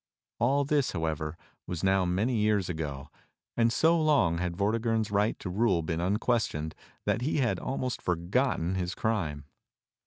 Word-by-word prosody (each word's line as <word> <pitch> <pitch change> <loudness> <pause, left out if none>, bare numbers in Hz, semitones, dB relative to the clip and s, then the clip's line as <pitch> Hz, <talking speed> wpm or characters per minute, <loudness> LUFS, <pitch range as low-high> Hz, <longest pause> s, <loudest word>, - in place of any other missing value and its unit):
All 140 +5 +2
this, 145 -2 +1
however, 80 -1 -2 0.3
was 90 -1 -4
now 95 -1 +3
many 105 +8 +1
years 105 -3 +2
ago; 75 -5 -4 0.5
and 115 0 +3
so 160 +6 +3
long 135 - +3
had 90 -1 -2
Vortigern's 110 +1 0
right 105 +2 +1
to - - -7
rule 95 -2 +1
been 80 +1 -2
unquestioned 95 -5 0 0.3
that 105 +2 +1
he 145 +5 0
had 130 -4 +1
almost 130 -2 -3
for 90 - +1
gotten 90 +1 0
his 90 0 -2
crime. 80 -11 -1
100 Hz, 155 wpm, -29 LUFS, 85-120 Hz, 0.5 s, now